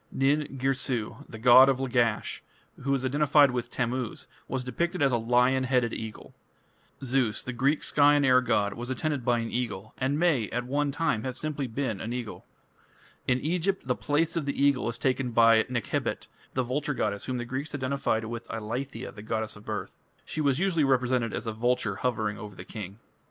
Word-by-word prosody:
Nin 140 +1 +1
Girsu, 130 -4 -1
the 110 - -8
god 125 +3 +8
of 130 -1 +1
Lagash, 120 -4 0 0.4
who 135 - -4
was 135 -1 +1
identified 145 +1 +4
with 120 -1 -3
Tammuz, 125 -1 -3 0.2
was 130 0 -2
depicted 170 +9 -2
as 140 -2 +3
a 120 - +2
lion 125 +3 +2
headed 125 -3 +1
eagle. 110 -1 -7 0.7
Zeus, 125 -4 0
the 125 - -5
Greek 140 +5 +1
sky 145 0 +4
and 145 -1 +3
air 130 -1 +5
god, 105 -5 +1
was 120 +2 -7
attended 145 0 -2
by 120 0 +2
an 115 -1 -3
eagle, 110 -4 -3
and 135 +3 0
may, 150 - +2
at 120 0 -2
one 145 +2 0
time, 155 -3 0
have 130 -1 -4
been 155 0 -3
simply 135 -5 -3
an 115 -1 -3
eagle. 120 -4 -6 0.8
In 125 0 +2
Egypt 180 +2 -1
the 125 - +3
place 150 +5 0
of 160 -4 -2
the 140 - -2
eagle 140 -4 +3
is 115 - -5
taken 130 -1 0
by 115 -1 +6
Nekhebit, 120 -4 -2 0.3
the 130 - +2
vulture 145 +3 -2
goddess 100 -3 -2
whom 130 -1 -2
the 120 - -3
Greeks 135 +5 -4
identified 130 -4 -1
with 115 +1 -6
"Eileithyia, 115 +5 -5
the 105 - -10
goddess 110 0 -3
of 105 - -14
birth; - - -4 0.3
she 155 - -3
was 140 -3 +2
usually 175 -3 +2
represented 125 -3 +2
as 115 - -4
a 110 - -2
vulture 115 -3 0
hovering 110 -2 -1
over 105 -3 -8
the 90 - -9
king". 100 -2 -7
125 Hz, 195 wpm, -28 LUFS, 115-140 Hz, 0.8 s, god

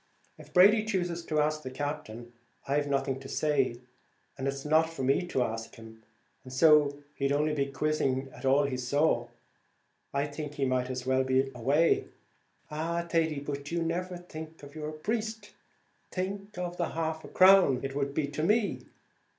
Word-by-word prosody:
If - - -13
Brady 205 +4 +6
chooses 175 -5 -2
to 155 -2 0
ask 155 +1 +1
the 130 - -6
Captain, 130 -4 -5 0.3
I've 145 +1 +1
nothing 135 -1 0
to 135 0 -10
say; 135 -5 0 0.5
it's 135 +1 -3
not 160 +2 +3
for 165 -5 -5
me 135 +7 +2
to 130 -7 +1
ask 115 -1 -5
him, 110 0 -13 0.4
and, 130 - -11
as 130 +5 -2 0.5
he'd 140 0 0
only 150 +2 +1
be 140 -2 0
quizzing 135 -2 0
at - - -12
all 135 +2 +4
he 135 -2 -1
saw, 145 +5 +1 0.8
I 140 +1 0
think 150 0 -6
he 140 -2 0
might 130 -1 0
as 125 -1 -4
well 130 0 +2
be 130 +1 +1
away." 140 +7 +2 0.7
"Ah! 170 +3 -2
Thady, 160 -4 0
but 145 0 -5
you 170 0 0
never 180 +2 -2
think 160 -3 -10
of 145 0 -11
your 155 -1 -5
priest; 220 +6 -3 0.6
think 195 +2 -4
of 175 -1 -4
the 170 - -1
half 160 -1 -3
crown 185 -9 +6
it 135 0 -3
would 140 0 -2
be 155 - +1
to 150 +1 -4
me. 210 +5 +2
150 Hz, 170 wpm, -29 LUFS, 135-170 Hz, 0.8 s, Brady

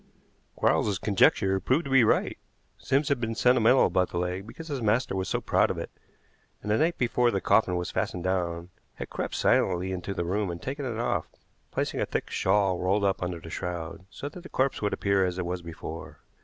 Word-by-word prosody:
Quarles's 100 -3 +2
conjecture 95 -1 +3
proved 130 - +1
to 135 - -5
be 135 -2 +6
right. 110 - +1 0.4
Sims 140 +2 +1
had 140 -4 +1
been 115 -1 -2
sentimental 125 +1 +5
about 90 -1 +1
the - - -4
leg 90 +3 -2
because 165 +7 -9
his 140 -5 -3
master 110 0 +1
was 95 0 -2
so - - 0
proud - - +2
of - - -3
it, - - -5 0.7
and 105 - -2
the 110 - +3
night 165 +3 +2
before 120 0 +2
the 100 - 0
coffin 100 -2 +3
was 90 0 -2
fastened 95 -2 -2
down 90 -2 -2 0.2
had - - -7
crept - - -3
silently 90 0 +2
into 95 +1 -4
the 85 - -2
room 100 +2 -1
and 85 0 -5
taken 140 - -4
it 120 -4 -3
off, 120 - -1 0.4
placing - - -2
a - - 0
thick - - -3
shawl 95 -1 +2
rolled 95 +3 +1
up 95 -1 +1
under 90 -1 -3
the 80 0 -10
shroud, 85 -1 -5
so 140 - -7
that 175 +5 -9
the 185 - -11
corpse 130 +1 0
would 105 - 0
appear 100 -1 +1
as 90 -1 -1
it 90 - -2
was 90 0 -3
before. 80 -1 -8
100 Hz, 215 wpm, -27 LUFS, 90-120 Hz, 0.7 s, be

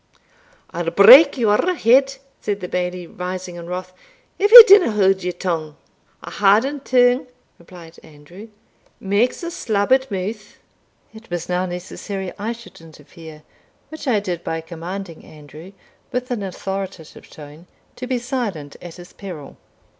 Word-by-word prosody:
"I'll 170 0 -3
break 250 - +7
your 235 - +1
head," 270 +1 +3 0.3
said 205 -1 -3
the 180 - -7
Bailie, 180 0 -4
rising 180 +1 -7
in 170 0 -10
wrath, 185 0 -6 0.5
"if 410 +2 +1
ye 480 0 +14
dinna 400 - +6
haud 195 -2 +1
your 180 - -3
tongue." 165 -4 -5 0.5
"A - - -9
hadden 220 +9 +2
tongue," 250 -1 +1 0.3
replied 170 -1 -15
Andrew, 160 +8 -15 0.5
"makes 205 - -1
a 340 - -5
slabbered 255 +1 0
mouth." 205 +2 -6 0.6
It 220 +1 -15
was 175 -1 -5
now 180 +1 -2
necessary 185 +2 -7
I 215 +3 -3
should 235 -6 -13
interfere, 160 0 -15 0.5
which 315 -2 -10
I 225 -5 +2
did 180 -4 -6
by 165 - -4
commanding 170 +2 -9
Andrew, 155 +4 -14 0.4
with 250 0 -4
an 235 -4 -3
authoritative 190 -3 -7
tone, 150 +3 -14 0.3
to 250 - -7
be 255 -1 -1
silent 235 - -5
at 175 -2 -11
his 175 -1 -14
peril. 175 -8 -10
190 Hz, 145 wpm, -19 LUFS, 175-235 Hz, 0.6 s, ye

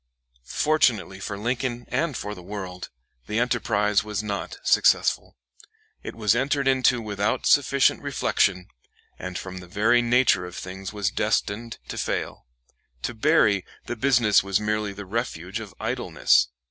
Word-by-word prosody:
Fortunately 120 -11 +1
for 100 +1 -5
Lincoln 120 +2 -2
and 140 +2 -1
for 105 - -5
the 90 - -10
world, 90 -1 -7 0.4
the 105 - -2
enterprise 110 -4 +1
was 105 0 -3
not 100 -2 -4
successful. - - +2 0.6
It - - -7
was 105 -2 +2
entered 135 +3 0
into 130 -2 +3
without 105 0 -1
sufficient 140 -1 +3
reflection, 100 -9 0 0.5
and 90 -1 -5
from 95 -1 -7
the 90 - -12
very 110 +6 +3
nature 120 -6 +3
of 90 - -10
things 95 +1 -7
was 105 -2 -1
destined 115 +3 -1
to - - -5
fail. - - -3 0.6
To - - -2
Berry 110 - +3 0.2
the 120 - -4
business 115 -4 +4
was 100 -1 +1
merely 105 -1 -1
the 100 +1 -8
refuge 95 -3 -3
of 105 -3 -8
idleness. - - +2
105 Hz, 145 wpm, -25 LUFS, 100-120 Hz, 0.6 s, business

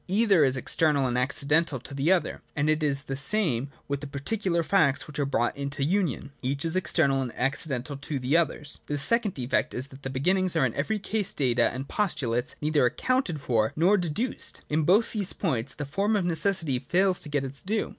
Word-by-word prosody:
Either 195 -3 +4
is 135 -1 +2
external 145 +1 +2
and 125 -1 -1
accidental 140 +3 +1
to 140 - -10
the 140 +5 +1
other; 185 -2 0
and 150 +1 +1
it 155 +1 0
is 140 -2 +1
the 135 -2 -4
same 140 - +2 0.2
with 140 -1 -3
the 145 - -6
particular 170 +5 -1
facts 150 -6 +2
which 150 -1 -8
are 140 - 0
brought 120 -3 0
into 140 0 -3
union: 170 -4 -1
each 140 +4 -2
is 165 - -1
external 155 -6 +2
and 125 -2 -4
accidental 135 0 -2
to 140 +1 -5
the 130 +4 0
others. 155 -3 +1
The 145 - -2
second 210 - +2
defect 125 0 -1
is 130 +3 -1
that 135 0 -14
the 135 - -5
beginnings 180 +7 +1
are 155 -5 +3
in 120 - -1
every 215 +10 -1
case 210 0 0
data 120 -4 +2
and 130 +3 -6
postulates, 130 - -1
neither 150 -1 +1
accounted 180 - 0
for 110 -4 0
nor 180 +6 +4
deduced. 190 +7 -2
In 155 0 +1
both 205 +7 +4
these 205 -4 0
points 130 - -2
the 145 - -5
form 200 +10 0
of 195 -4 0
necessity 170 -5 0
fails 180 +7 +1
to 150 - -7
get 145 -2 -1
its 135 +1 -5
due. 215 +3 -2
150 Hz, 205 wpm, -26 LUFS, 135-185 Hz, 0.2 s, Either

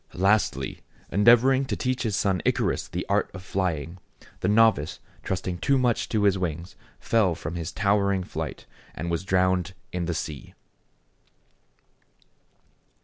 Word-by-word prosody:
Lastly, 95 - +1 0.3
endeavoring 120 +6 +5
to 135 - -2
teach 130 0 -1
his 110 -4 -1
son 95 -3 +1
Icarus - - 0
the - - -4
art - - +1
of 95 - -8
flying, 90 -3 -2 0.4
the - - -1
novice, 105 -7 +3 0.2
trusting 90 -1 -3
too 135 +9 +2
much 125 -3 +1
to 110 -2 +1
his 100 -2 +3
wings, 85 0 -4 0.2
fell 105 -7 +2
from 75 +1 -6
his 85 -1 -4
towering 100 -2 +1
flight, - - -6 0.3
and 85 +3 -4
was 85 +1 -1
drowned 95 -1 +1 0.2
in 90 -1 -2
the 85 0 -2
sea. 75 -3 -6
95 Hz, 140 wpm, -26 LUFS, 85-105 Hz, 0.4 s, endeavoring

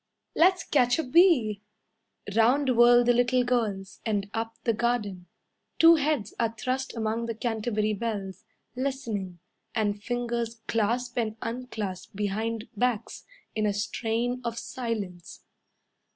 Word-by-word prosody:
"Let's 365 +2 +4
catch 245 -4 +3
a 320 - 0
bee." 255 - +4 0.7
Round 255 +3 +3
whirl 240 +1 +7
the 245 0 +4
little 245 +1 +3
girls, 215 -6 -2
And 205 -3 -1
up 225 0 -3
the 230 - +2
garden. 210 -6 -1 0.5
Two 330 0 +8
heads 290 -8 0
are 230 -1 0
thrust 260 +2 -2
among 225 +1 -1
the 230 - -3
Canterbury 215 -2 -1
bells, 200 -3 -4 0.3
Listening, 230 -9 -3 0.4
And 205 -2 0
fingers 235 0 -2
clasp 240 +3 0
and 220 -1 -2
unclasp 220 -6 -5
behind 215 +3 -2
backs 245 0 -1 0.3
In 215 -1 0
a 205 - +1
strain 230 +4 -1
of 235 -1 -3
silence. 225 -8 -5
230 Hz, 125 wpm, -27 LUFS, 210-245 Hz, 0.7 s, Two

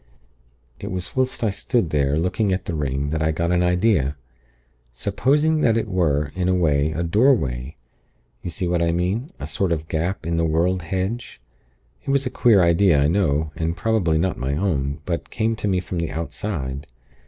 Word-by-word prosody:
"It - - -6
was 90 -1 -4
whilst 130 -2 0
I 110 - +2
stood 110 - -1
there, 70 0 +1
looking 90 +5 0
at 95 +1 -1
the - - -3
ring, 70 -1 -2
that 80 0 -1
I 80 - +2
got 85 +2 -1
an 90 0 +2
idea. 90 -5 +2 0.8
Supposing 150 - +1
that 115 -4 +3
it 115 - -1
were, 75 -7 0
in 90 0 -1
a 90 - +3
way, 75 -4 +2
a 80 +2 -2
doorway 80 - +1 0.7
You - - -5
see 90 +2 -3
what 85 0 +1
I 85 0 +2
mean? 95 - -1
A - - -5
sort 95 -3 -1
of 80 -1 -2
gap 85 +3 -2
in 85 0 -1
the 85 - +1
world 85 +3 +1
hedge. 95 - -4 0.6
It - - -7
was 140 0 +2
a 125 - -2
queer 105 -6 +4
idea, 85 -2 +4
I 70 +1 +3
know, 80 -5 +1
and 80 +1 -2
probably 105 -8 +1
was 80 - +1
not 95 - -1
my 70 +2 -1
own, 75 -5 -1
but 85 -2 -3
came 115 0 0
to 105 - -2
me 95 -2 +2
from 90 -1 -4
the 85 -1 -2
Outside. 70 -3 -4
85 Hz, 200 wpm, -22 LUFS, 80-100 Hz, 0.8 s, queer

